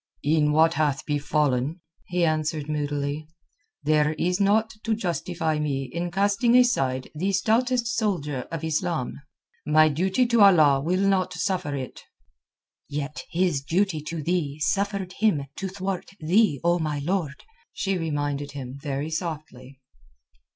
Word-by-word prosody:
"In 150 0 +3
what 160 +2 +4
hath 145 -4 0
befallen," 145 0 0 0.3
he 175 -1 +1
answered 155 -1 -1
moodily, 145 0 -2 0.6
"there 150 0 +3
is 180 +4 -1
naught 210 +2 +2
to 225 -1 +1
justify 170 -5 -2
me 140 -3 -1
in 175 +1 -2
casting 200 +6 +2
aside 135 - +2
the 185 +6 -1
stoutest 235 +5 +2
soldier 180 - -1
of 165 -2 -4
Islam. 160 -4 -2 0.4
My 155 +1 +5
duty 190 - +1
to 235 -2 +3
Allah 155 -9 +6
will 185 +6 +1
not 190 -2 +1
suffer 180 -7 -1
it." 130 -2 -6 0.9
"Yet 145 +1 -4
his 170 -5 +1
duty 170 +2 0
to 160 -1 -4
thee 155 -3 -1
suffered 200 +1 -1
him 195 -10 +2
to 195 - -3
thwart 190 -1 -4
thee, 175 - +3
O 175 +1 +3
my 155 -2 -1
lord," 150 -1 -2 0.3
she 195 -1 -1
reminded 145 -4 -2
him 135 -1 -7
very 145 +1 -3
softly. 150 -6 -6
160 Hz, 135 wpm, -25 LUFS, 145-190 Hz, 0.9 s, Allah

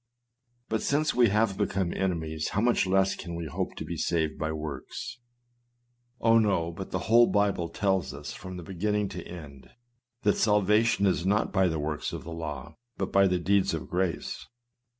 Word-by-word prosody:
But 110 0 -1
since 150 +2 +1
we 120 -3 +5
have 105 -1 +1
become 95 -3 0
enemies, 80 -4 -2
how 105 - +1
much 120 -4 +2
less 95 +1 +3
can 85 -1 -7
we 85 0 -4
hope 80 - -3
to - - -6
be - - -5
saved 80 -2 0
by 80 0 -1
works! 80 - -6 1.0
Oh! 115 0 +5
no; 95 -6 +1
but 95 +3 -7
the - - -1
whole 120 +1 +6
Bible 100 -5 +1
tells 95 -3 0
us, - - -7
from 95 -1 -8
beginning 100 +3 -1
to 90 - -6
end, 75 -6 -10 0.5
that 105 - +3
salva 105 0 +4
tion 115 -3 +2
is 95 -3 +2
not 105 +3 +1
by 95 -2 +4
the 80 -2 -1
works 75 0 -3
of - - -5
the 85 - -7
law, 75 -5 -6 0.2
but 95 - -2
by 100 0 +5
the 90 -1 +1
deeds 95 +3 +2
of - - -6
grace. 90 -1 -2
95 Hz, 185 wpm, -28 LUFS, 85-105 Hz, 1.0 s, whole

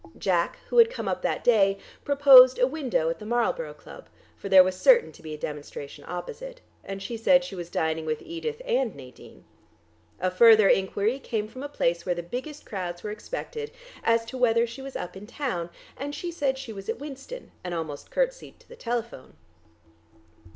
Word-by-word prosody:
Jack, 175 -3 0
who 485 - +3
had 460 0 +8
come - - -6
up - - -2
that - - -2
day, 200 -5 +4 0.3
proposed 270 -3 +8
a 250 - +4
window 260 - -1
at - - -6
the 210 - -9
Marlborough 240 - -1
Club, - - -14 0.3
for 200 - -8
there 190 -1 +9
was 185 0 -2
certain 485 - +5
to - - -17
be 160 -1 -8
a - - -10
demonstration 145 -1 -7
opposite, 485 - -7 0.2
and 195 0 -6
she 235 - -5
said 270 +4 +4
she 265 - -8
was 175 -2 -6
dining 160 -1 -1
with 155 -1 -2
Edith 450 +9 -5
and 270 - 0
Nadine. 130 -2 -14 0.8
A 185 0 0
further 215 +1 +7
enquiry 200 +7 +1
came 220 -5 -3
from 255 +4 -10
a 285 - -5
place 170 -11 0
where 180 -2 -1
the 175 - -5
biggest 255 - -7
crowds 175 -3 -5
were 210 - -4
expected, 450 - -6 0.3
as 230 0 +2
to 255 +3 -7
whether 230 -1 +3
she 235 +3 -9
was 270 0 -8
up 180 - -5
in 200 +2 -10
town, 235 - -3 0.3
and 285 +2 -5
she 350 - -5
said 280 -5 -1
she 265 -4 -7
was 195 -1 -9
at - - -1
Winston, 290 - -9
and 180 -1 -4
almost 155 -3 -6
curtsied - - -2
to - - -24
the 485 - -12
telephone. 235 - -5
230 Hz, 195 wpm, -26 LUFS, 185-285 Hz, 0.8 s, there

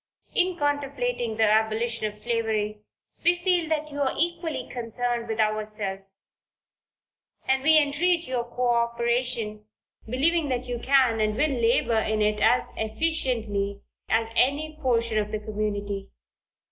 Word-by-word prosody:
In 365 -1 +1
contemplating 290 - -1
the 225 - +3
abolition 220 +1 +2
of 210 0 -8
slavery, 215 -2 -1 0.4
we 345 +1 +5
feel 350 -2 +1
that 305 -1 -1
you 285 0 -4
are 270 - +1
equally 330 -5 -1
concerned 240 0 -3
with 220 0 -3
ourselves, 210 -3 -1 1.2
and 265 0 +2
we 315 +3 +6
entreat 325 +4 +2
your 250 -2 -1
co 245 +1 -1
operation, 235 -2 -1 0.4
believing 295 +6 +1
that 250 -1 -1
you 245 -1 -4
can 255 -4 +3
and 215 0 +1
will 300 +6 +2
labor 235 -2 +2
in 220 0 0
it 210 0 +1
as 225 +4 +4
efficiently 220 -6 -1 0.3
as 225 +1 +2
any 295 +5 +1
portion 230 -4 +2
of 210 0 -2
the 215 - -2
community. 205 -2 -3
235 Hz, 135 wpm, -26 LUFS, 215-285 Hz, 1.2 s, we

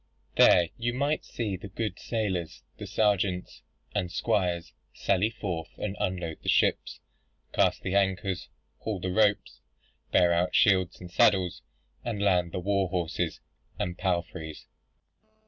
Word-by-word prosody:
There 85 -2 +6
you 120 +1 -1
might 145 +3 0
see 105 -5 -3
the 95 +2 -8
good 105 +1 -4
sailors, 95 -8 -2 0.2
the - - -6
sergeants, 100 -4 0 0.3
and 90 -4 -1
squires 90 -4 0 0.2
sally 100 +2 +2
forth 90 -8 -5
and 100 -1 -3
unload 90 -5 -2
the - - -3
ships; - - +2 0.5
cast - - +2
the 95 - -2
anchors, 95 -1 0 0.3
haul 105 -4 -3
the 95 +1 -2
ropes, 105 +1 +2 0.5
bear 85 -1 +5
out 85 +1 +1
shields 95 -4 +4
and 90 -1 -10
saddles, 90 -1 +3 0.4
and 115 -4 -3
land 90 -4 +2
the 90 - -3
war 100 0 +1
horses 85 -2 -2 0.4
and 90 -1 -2
palfreys. 85 -4 -3
95 Hz, 135 wpm, -28 LUFS, 90-100 Hz, 0.5 s, There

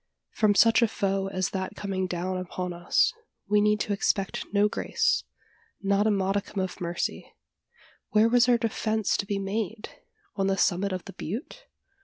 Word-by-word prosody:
From 210 -2 +2
such 230 +3 +5
a 235 - +5
foe 195 -2 -1
as 185 -2 -2
that 190 -1 -4
coming 190 -2 -2
down 180 +1 -3
upon 180 0 -4
us, 175 0 +2 0.3
we 210 0 +3
need 210 0 +2
expect 200 -1 -1
no 205 +1 +4
grace 425 - 0 0.5
not 200 +2 +2
a - - +4
modicum 195 0 -1
of 185 -1 -5
mercy. 170 0 -3 0.7
Where 215 +1 +4
was 245 +1 +4
our 240 - +5
defence 220 -1 0
to 200 - -3
be 200 - -1
made? 210 +2 -3 0.5
On 195 -1 0
the 195 0 +1
summit 195 +1 +1
of 185 -1 -4
the - - -9
butte? 265 - -6
200 Hz, 165 wpm, -27 LUFS, 190-215 Hz, 0.7 s, such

